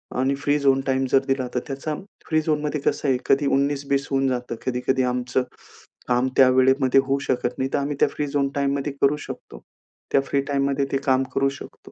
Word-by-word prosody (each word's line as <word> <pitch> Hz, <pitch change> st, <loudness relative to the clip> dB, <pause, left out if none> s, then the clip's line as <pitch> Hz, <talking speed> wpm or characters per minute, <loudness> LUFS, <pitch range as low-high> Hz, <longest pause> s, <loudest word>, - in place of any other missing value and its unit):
आम्ही 130 Hz, +2 st, +1 dB
free 145 Hz, +1 st, 0 dB
zone 135 Hz, -1 st, +3 dB
time 135 Hz, 0 st, +1 dB
जर 135 Hz, -, +6 dB
दिला 135 Hz, -2 st, 0 dB
तर -, -, +2 dB
त्याचा 140 Hz, +3 st, -4 dB, 0.3 s
फ्री 155 Hz, -1 st, +2 dB
झोनमध्ये 150 Hz, -1 st, -1 dB
कसं 145 Hz, -, -1 dB
आहे 130 Hz, -, +3 dB
कधी 140 Hz, +1 st, +2 dB
उन्नीस 140 Hz, +1 st, +1 dB
बीस 140 Hz, 0 st, +1 dB
होऊन 135 Hz, 0 st, +2 dB
जातं. 125 Hz, -2 st, -3 dB
कधी, 125 Hz, -1 st, -1 dB
कधी 130 Hz, 0 st, +2 dB
आमचं 125 Hz, 0 st, 0 dB, 0.7 s
काम 125 Hz, +1 st, +2 dB
त्या 130 Hz, -1 st, +7 dB
वेळेमध्ये 130 Hz, +1 st, +4 dB
होऊ 135 Hz, +1 st, 0 dB
शकत 125 Hz, -1 st, -1 dB
नाही 130 Hz, 0 st, -1 dB
तर -, -, +2 dB
आम्ही 140 Hz, +1 st, -2 dB
त्या -, -, +6 dB
फ्री 150 Hz, -, -3 dB
झोन 140 Hz, -1 st, 0 dB
टाईममध्ये 140 Hz, 0 st, -1 dB
करू 140 Hz, +2 st, +3 dB
शकतो. -, -, -9 dB, 0.5 s
त्या 135 Hz, -, +4 dB
फ्री 140 Hz, 0 st, -1 dB
टाईममध्ये 140 Hz, 0 st, +1 dB
ते -, -, +3 dB
काम 130 Hz, -1 st, +3 dB
करू 135 Hz, 0 st, +3 dB
शकतो. 140 Hz, -, -11 dB
135 Hz, 205 wpm, -23 LUFS, 130-140 Hz, 0.7 s, त्या